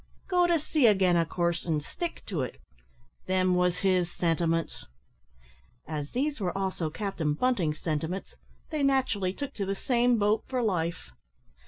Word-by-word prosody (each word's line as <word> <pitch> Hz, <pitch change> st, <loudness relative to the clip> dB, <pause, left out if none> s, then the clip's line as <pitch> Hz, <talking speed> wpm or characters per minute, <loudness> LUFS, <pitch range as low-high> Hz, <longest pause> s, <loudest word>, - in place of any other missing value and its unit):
go 360 Hz, -2 st, +3 dB
to 340 Hz, -1 st, +4 dB
sea 300 Hz, -3 st, +2 dB
again, 190 Hz, -4 st, +4 dB
of 165 Hz, -1 st, +2 dB
coorse, 170 Hz, -1 st, 0 dB
an' 160 Hz, -3 st, 0 dB
stick 340 Hz, -, -5 dB
to 175 Hz, -9 st, -2 dB
it; 125 Hz, -, -5 dB, 0.7 s
them 185 Hz, 0 st, +2 dB
wos 180 Hz, 0 st, +2 dB
his 180 Hz, -2 st, +3 dB
sentiments." 165 Hz, -1 st, -1 dB, 1.0 s
As 150 Hz, -2 st, -4 dB
these 285 Hz, +2 st, -1 dB
were 185 Hz, 0 st, -1 dB
also 190 Hz, -4 st, -1 dB
Captain 165 Hz, -4 st, -2 dB
Bunting's 175 Hz, -8 st, +1 dB
sentiments, 165 Hz, +4 st, -3 dB, 0.4 s
they 305 Hz, -2 st, -1 dB
naturally 260 Hz, -9 st, +2 dB
took 280 Hz, +7 st, -6 dB
to 200 Hz, -, -3 dB
the 195 Hz, -, -1 dB
same 245 Hz, +2 st, +2 dB
boat 210 Hz, +1 st, +2 dB
for 255 Hz, -2 st, -1 dB
life. 170 Hz, -, -1 dB
185 Hz, 155 wpm, -28 LUFS, 165-245 Hz, 1.0 s, to